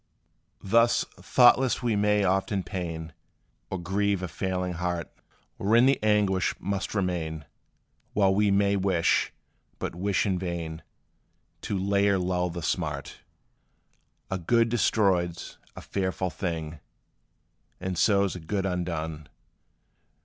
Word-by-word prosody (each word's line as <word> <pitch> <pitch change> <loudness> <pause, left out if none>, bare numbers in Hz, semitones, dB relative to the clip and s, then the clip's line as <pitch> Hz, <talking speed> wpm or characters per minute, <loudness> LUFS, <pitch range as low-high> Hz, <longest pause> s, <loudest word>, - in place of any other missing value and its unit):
Thus, 115 +4 +3
thoughtless 130 0 +4
we 115 -3 +1
may 105 0 +2
often 95 +1 +1
pain 85 -3 -5 0.6
Or 95 - -3
grieve 95 +2 0
a - - -2
feeling 90 +2 -2
heart, 85 0 -3 0.4
Wherein 115 +5 +4
the 135 +1 +3
anguish 105 -3 +2
must 100 +1 -3
remain, 85 -6 -2 0.7
While 95 -2 +3
we 105 +1 +3
may 100 0 +3
wish, 95 -3 +2 0.5
but - - -4
wish 95 +4 0
in 95 -3 0
vain, 85 -3 -4 0.8
To 100 - -2
lay 100 +1 +2
or 100 - +3
lull 90 -1 0
the 85 -1 -6
smart. 75 -3 -3 1.1
A 95 - -1
good 115 +7 +2
destroyed 95 -7 +2
's - - -10 0.2
a - - -8
fearful 95 -1 -2
thing, 80 -3 -4 1.0
And 95 0 -3
so 100 +3 +3
's 95 - -5
a - - -6
good 95 +4 -2
undone! 80 -5 -3
95 Hz, 125 wpm, -27 LUFS, 85-100 Hz, 1.1 s, thoughtless